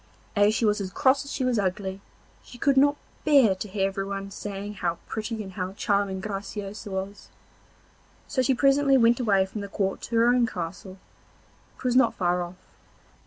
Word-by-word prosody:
As 205 +1 +4
she 230 - +1
was 210 0 +2
as 190 - -3
cross 265 +6 +2
as 280 - -8
she 265 - -2
was 245 -3 +1
ugly, 190 0 -2 0.4
she 245 - -13
could 275 +3 +2
not 285 +2 +5 0.3
bear 275 -9 +5
to 190 +3 -6
hear 195 0 0
everyone 195 0 -4
saying 205 +1 -6
how 170 -1 0
pretty 220 0 -4
and 190 - -9
how 185 0 -4
charming 200 -1 0
Graciosa 205 +1 -6
was; 195 +1 -5 1.0
so 260 - 0
she 255 +1 +2
presently 275 +1 +4
went 235 0 +4
away 200 -6 +3
from 205 +2 -6
the 200 - -5
court 195 -1 -2
to 235 - -5
her 230 0 +5
own 245 -1 +4
castle, 185 +1 -6 0.8
which - - -14
was 250 -1 +1
not 255 -3 +4
far 180 -1 +1
off. 175 +1 -6
205 Hz, 185 wpm, -26 LUFS, 195-240 Hz, 1.0 s, not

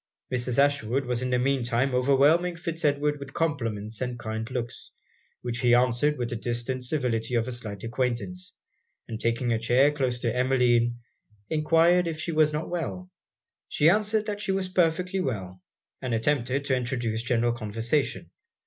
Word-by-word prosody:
Mrs. 125 -1 -1
Ashwood 140 -2 +2
was 125 -1 -1
in 130 - -1
the 125 - +2
mean 130 0 +1
time 120 +3 0
overwhelming 140 +7 +3
Fitz 170 -1 -5
Edward 145 0 +1
with 140 0 -9
compliments 115 -9 -2
and 125 -1 -2
kind 110 -1 -4
looks, 125 -3 -5 0.5
which 120 -1 -2
he 120 -1 +4
answered 125 +4 +2
with 120 -2 -3
the - - -2
distant 120 +2 -3
civility 125 -4 -1
of 115 0 +1
a - - -3
slight 110 -5 -6
acquaintance; 115 -7 -3 0.5
and 110 -1 -6
taking 115 +1 +1
a 115 - 0
chair 125 +5 +4
close 130 -4 -1
to 115 -1 -1
Emmeline, 125 -2 +2 0.5
enquired 165 +3 +4
if 160 -2 -3
she 170 - -2
was 155 -1 +3
not 150 +1 -3
well? 180 +1 -4 0.6
She 155 +3 +4
answered 210 +1 +1
that 205 -1 -4
she 195 - -1
was 190 -1 -1
perfectly 180 +1 +1
well; 95 - -4 0.4
and 125 -3 -1
attempted 135 +2 0
to 130 - +2
introduce 120 -3 -2
general 120 0 +1
conversation. 115 +5 -2
125 Hz, 165 wpm, -27 LUFS, 120-150 Hz, 0.6 s, he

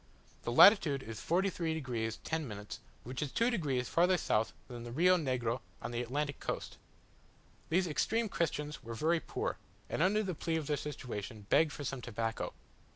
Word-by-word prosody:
The 120 - -3
latitude 145 - +7
is 115 -1 -7
43 170 -2 0
degs. 115 -5 -2
10', 115 -11 -3 0.4
which 130 +3 -5
is 145 -3 -2
two 235 +2 +2
degrees 140 - 0
farther 180 +2 +4
south 110 -8 +1 0.2
than 120 -2 -7
the 120 - -7
Rio 180 +8 +5
Negro 125 -7 0 0.2
on - - -5
the 120 0 -1
Atlantic 140 +4 -2
coast. - - -4 0.9
These 180 +3 +3
extreme 225 +8 +1
Christians 150 -5 -2
were 115 0 -6
very 165 +7 +2
poor, - - -3 0.3
and, - - 0
under 205 +4 +3
the 190 -3 -2
plea 165 +1 -2
of 160 -2 -1
their 150 - +1
situation, 115 -7 -6
begged 155 -1 +5
for 145 - -6
some 135 -2 -3
tobacco. 115 -1 -3
145 Hz, 170 wpm, -33 LUFS, 120-170 Hz, 0.9 s, latitude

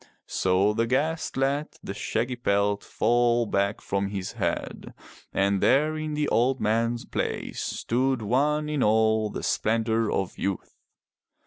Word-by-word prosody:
So 95 +3 +2
the 115 +1 0
guest 155 +7 -1
let 140 +3 -1
the 95 - -5
shaggy 120 +5 -2
pelt 100 -3 +1
fall 120 +1 +2
back 100 -1 0
from 100 0 -1
his 95 -2 -4
head, - - -4 0.4
and 100 0 +1
there 150 +4 +3
in 155 -1 -3
the 150 0 0
old 130 +3 +2
man's 115 +2 0
place - - -3
stood 130 0 -1
one 150 +7 +1
in 150 -2 -1
all 110 0 +3
the - - -6
splendor 115 0 +1
of 95 - -2
youth. 100 -1 -3
115 Hz, 140 wpm, -26 LUFS, 105-135 Hz, 0.4 s, there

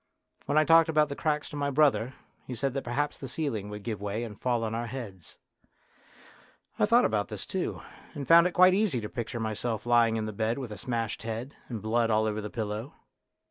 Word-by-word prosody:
When 145 - +1
I 155 - +5
talked 165 +1 +6
about 155 -1 +3
the 140 - -4
cracks 150 -1 -1
to - - -8
my 145 -1 -1
brother 135 -3 +2 0.3
he 125 - -5
said 135 +2 -1
that 135 - -3
perhaps 145 +5 -2
the 135 - -6
ceiling 125 -7 -3
would 105 0 -7
give 110 -3 -4
way 105 +3 -2
and 110 -3 -8
fall 120 -2 +1
on 110 0 -2
our 115 +1 -2
heads. 110 -8 -8 1.4
I - - +4
thought 235 +3 +5
about 105 -2 0
this 105 -3 -6
too, 190 -2 -3 0.3
and 140 -2 -5
found 170 +1 +7
it 180 - -5
quite 185 +1 +6
easy 195 - +1
to 105 -2 -5
picture 120 -1 -4
myself 110 0 -3
lying 120 -2 +4
in 110 -1 -1
the 110 - -5
bed 110 +3 -1
with 130 -5 -5
a 105 - -6
smashed 115 -3 -3
head, 115 +5 -5
and 115 -5 -5
blood 115 +1 +1
all 110 0 +3
over 110 0 -1
the 105 - -5
pillow. 110 +3 -4
120 Hz, 220 wpm, -28 LUFS, 110-145 Hz, 1.4 s, found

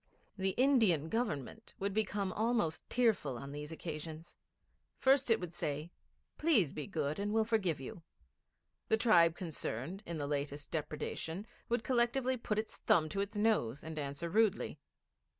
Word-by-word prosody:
The 190 -1 -1
Indian 225 - +4
Government 220 - -3
would 200 0 -2
become 200 -2 0
almost 220 -8 0
tearful 225 - +2
on 140 +3 -7
these 150 +1 -6
occasions. 160 0 -6 0.6
First 270 -1 +4
it 225 - +5
would 180 -1 -6
say, 150 0 -3 0.5
'Please 245 - +3
be 150 - -5
good 155 -4 -2
and 205 +1 -1
we'll 220 0 +3
forgive 205 -9 +1
you.' 135 +6 -7 0.9
The 220 - +3
tribe 170 -8 +5
concerned 165 - -4
in 170 -1 -3
the 145 - -2
latest 145 0 -3
depredation 160 +4 -3 0.2
would 235 -1 +1
collectively 250 +2 +2
put 225 -3 -2
its 215 +1 -3
thumb 155 -2 +3
to 195 - -1
its 200 +2 -4
nose 205 - +1
and 160 -1 -5
answer 140 +3 -3
rudely. 205 -5 +2
180 Hz, 150 wpm, -34 LUFS, 155-220 Hz, 0.9 s, it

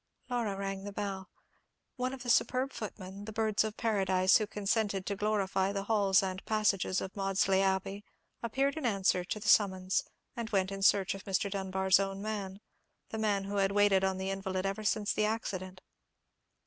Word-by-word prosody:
Laura 225 -5 -1
rang 195 0 -4
the 205 - -6
bell. 195 -2 -4 0.7
One 255 -1 -2
of 265 -2 -7
the 245 - -5
superb 255 +2 +2
footmen, 200 -2 -7
the 220 - -6
birds 220 -1 +1
of 215 0 -4
paradise 190 -4 +3
who 215 - -2
consented 205 -1 -1
to 200 - -2
glorify 195 -2 0
the 200 -1 -3
halls 200 -2 +3
and 185 0 -4
passages 210 -3 +1
of 190 - -6
Maudesley 195 -1 +2
Abbey, 195 +1 -1 0.4
appeared 270 +5 0
in 310 - -3
answer 195 -4 +2
to 215 - -4
the - - -6
summons, 190 -2 +3 0.3
and 235 -2 -4
went 195 -2 +1
in 195 0 -5
search 195 -1 +4
of 195 0 -9
Mr. 195 0 0
Dunbar's 190 -1 +2
own 195 0 -2
man—the 205 +1 -7
man 205 -2 +1
who 200 +1 -4
had 195 0 +2
waited 205 -2 +4
on 190 -1 +1
the 190 +1 -2
invalid 190 -1 -3
ever 195 +2 -2
since 210 0 +1
the 215 - +1
accident. 185 -4 -3
195 Hz, 180 wpm, -31 LUFS, 190-215 Hz, 0.7 s, search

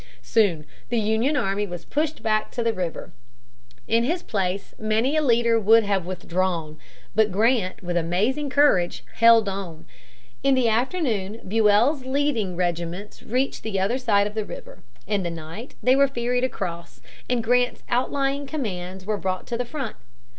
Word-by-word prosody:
Soon 190 -10 +2 0.2
the 240 - 0
Union 220 +7 +1
army 205 -4 0
was 175 -2 -7
pushed 310 +1 -2
back 215 -1 +1
to 240 - -3
the 230 -1 +1
river. 180 -4 -5 0.7
In 230 +1 +3
his 335 +8 -1
place 195 -1 -2
many 220 +6 +1
a 310 - +3
leader 235 -4 +3
would 225 +2 +5
have 195 -4 -1
withdrawn. 175 -3 -2 0.3
But 215 -1 +3
Grant, 210 -2 +1
with 175 0 -3
amazing 205 - 0
courage, 255 -11 +3
held 230 -2 +6
on. 190 -5 -5 0.6
In 275 -1 +3
the 255 -2 +2
afternoon 230 - -1
Buell's 225 +7 +3
leading 260 -8 0
regiments 175 +3 -3
reached 255 +4 -1
the 210 -3 -2
other 215 +7 0
side 205 -5 +3
of 210 - -4
the 215 0 -2
river. - - -10 0.3
In 205 -1 0
the 175 - -2
night 165 +8 -8
they 250 +3 +5
were 280 0 +5
ferried 245 -1 -1
across, 170 - -4 0.3
and 245 -2 +1
Grant's 245 +2 +1
outlying 275 +3 0
commands 190 - -5
were 210 0 -1
brought 185 -1 -3
to 240 - -4
the 245 - -2
front. 265 -2 -5
220 Hz, 160 wpm, -24 LUFS, 185-250 Hz, 0.7 s, held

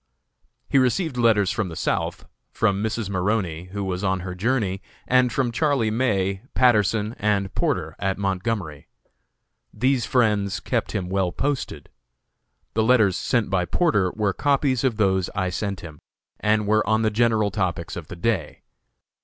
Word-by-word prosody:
He 135 - +3
received 130 +4 +1
letters 110 -5 +3
from 100 -3 -2
the 80 - -8
South, 85 - -2 0.3
from 100 -3 +1
Mrs. 110 0 -2
Maroney, 90 -3 -1
who 100 +2 -5
was 95 0 -3
on 95 -1 0
her 90 0 -5
journey, 100 -1 -1 0.3
and 125 -1 +3
from 125 0 0
Charlie 135 -4 +1
May, 100 -5 0
Patterson, 110 -3 +3
and 100 -2 0
Porter, - - -1
at 95 0 -1
Montgomery. 95 -5 -3 0.8
These 125 +2 +1
friends 105 -6 +1
kept - - -2
him 95 -3 -2
well 95 -1 0
posted. 140 +4 -3 0.9
The 110 - +1
letters 110 -5 +4
sent 115 -1 0
by 90 -2 +1
Porter 105 - +2
were 105 -3 0
copies 140 -2 +1
of 125 -5 +1
those 95 -4 +1
I 95 -2 -1
sent 100 -2 -3
him, 80 -3 -10 0.4
and 105 0 +2
were 110 +1 +2
on 110 +1 +2
the 110 - +2
general 110 -2 +2
topics - - -2
of - - -7
the - - -8
day. 90 -2 -2
105 Hz, 155 wpm, -23 LUFS, 95-115 Hz, 0.9 s, letters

